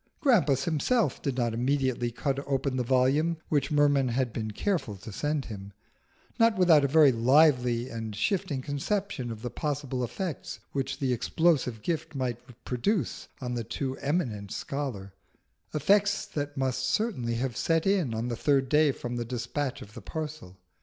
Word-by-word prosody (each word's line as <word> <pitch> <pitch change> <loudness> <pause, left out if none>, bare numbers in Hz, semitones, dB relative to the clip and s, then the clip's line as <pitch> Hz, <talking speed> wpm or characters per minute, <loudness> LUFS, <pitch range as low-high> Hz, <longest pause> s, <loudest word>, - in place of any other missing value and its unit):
Grampus 150 - +3
himself 175 - +1
did 135 -4 -2
not 120 -2 +1
immediately 125 0 0
cut 135 +3 -2
open 135 -1 0
the 130 - 0
volume 135 +7 +2
which 145 -3 +1
Merman 145 -3 +3
had 125 -1 0
been 110 -1 -3
careful 125 - -1
to 105 +3 -9
send 145 +6 -1
him, 100 -3 -8 0.7
not 230 -2 +4
without 170 -5 +6
a - - +3
very 150 0 +6
lively 125 -1 +4
and 115 -3 -5
shifting 140 - -1
conception 150 - -2
of 110 0 -7
the 120 - -3
possible 140 -4 -2
effects 165 - -4
which 135 -1 -2
the 130 -3 0
explosive 125 -3 +1
gift 160 -2 -2
might 125 -3 -2 0.3
produce 135 - -1
on 125 -1 -3
the 120 -1 -2
too 130 +4 -3
eminent 120 - -2
scholar 125 -9 -4 0.6
effects 200 +8 +2
that 145 -1 -4
must 130 -1 0
certainly 130 - 0
have 125 0 -2
set 165 +5 +1
in 185 - +1
on 115 +2 -2
the 120 - -2
third 135 +1 +2
day 150 -1 +4
from 120 -2 -5
the 120 - -1
despatch 125 +3 -3
of 105 - -15
the - - -9
parcel. 155 - -6
135 Hz, 165 wpm, -28 LUFS, 120-155 Hz, 0.7 s, without